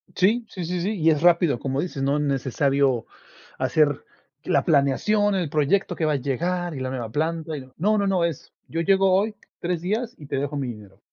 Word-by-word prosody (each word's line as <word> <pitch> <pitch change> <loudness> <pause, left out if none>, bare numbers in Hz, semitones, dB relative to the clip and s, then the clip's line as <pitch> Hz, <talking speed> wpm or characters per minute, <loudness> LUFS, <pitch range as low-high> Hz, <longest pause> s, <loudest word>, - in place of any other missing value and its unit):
Sí, 220 +6 +2
sí, 180 -3 -5
sí, 180 0 -2
sí, 200 +1 -2
y 160 +1 +4
es 150 0 0
rápido, 170 -6 +4
como 135 +1 -1
dices, 165 -6 -4
no 140 +2 +1
es 150 - 0
necesario 135 -2 +1 0.5
hacer 145 -3 +2 0.4
la 140 - +1
planeación, 195 +8 +2
el 175 -6 -1
proyecto 155 +5 +1
que 160 - -1
va 155 - +2
a - - +1
llegar, 170 +6 -2
y - - -5
la 130 0 -3
nueva 120 -4 -4
planta, 160 +1 -2
y 140 - -5
no, 130 0 -15
no, 210 +6 +2
no, 200 - +1
no. 185 -3 +2
Es, 165 -5 -5
yo 165 +1 -2
llego 195 +2 +3
hoy 210 +3 +1 0.2
3 175 -1 -2
días, 220 +6 -2
y 150 - -11
te 140 -1 -3
dejo 145 +1 -2
mi 135 -2 -2
dinero. 105 -4 -10
155 Hz, 220 wpm, -24 LUFS, 140-180 Hz, 0.5 s, y